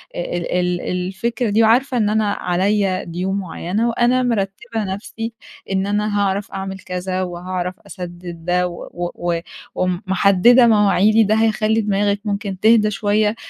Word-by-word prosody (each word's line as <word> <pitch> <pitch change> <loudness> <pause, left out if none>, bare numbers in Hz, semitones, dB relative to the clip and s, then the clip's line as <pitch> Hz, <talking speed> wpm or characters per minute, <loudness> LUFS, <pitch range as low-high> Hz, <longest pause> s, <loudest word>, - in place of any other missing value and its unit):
ال 175 0 -3
ال 180 -1 0
الفكرة 195 +6 -2
دي 220 +2 +3
وعارفة 245 +3 +3
إن 210 -2 +2
أنا 215 -1 +1
عليّا 190 +1 0
ديون 185 +3 -3
معيّنة 195 +5 -2
وأنا 245 +2 +2
مرتّبة 225 0 -2
نفسي 225 +3 -6 0.4
إن 195 +1 0
أنا 205 0 0
هاعرف 200 0 -1
أعمل 190 0 -5
كذا 185 0 -3
وهاعرف 180 +1 -4
أسدد 175 -2 -8
ده 180 0 +1
و 175 0 -6
و 175 -1 -1 0.4
ومحدّدة 190 +6 +4
مواعيدي، 215 0 +4
ده 215 +1 +2
هيخلّي 220 0 +2
دماغِك 205 -1 0
ممكن 200 -2 -3
تهدى 215 0 +4
شويّة، 210 +1 +1
200 Hz, 140 wpm, -19 LUFS, 180-215 Hz, 0.4 s, ومحدّدة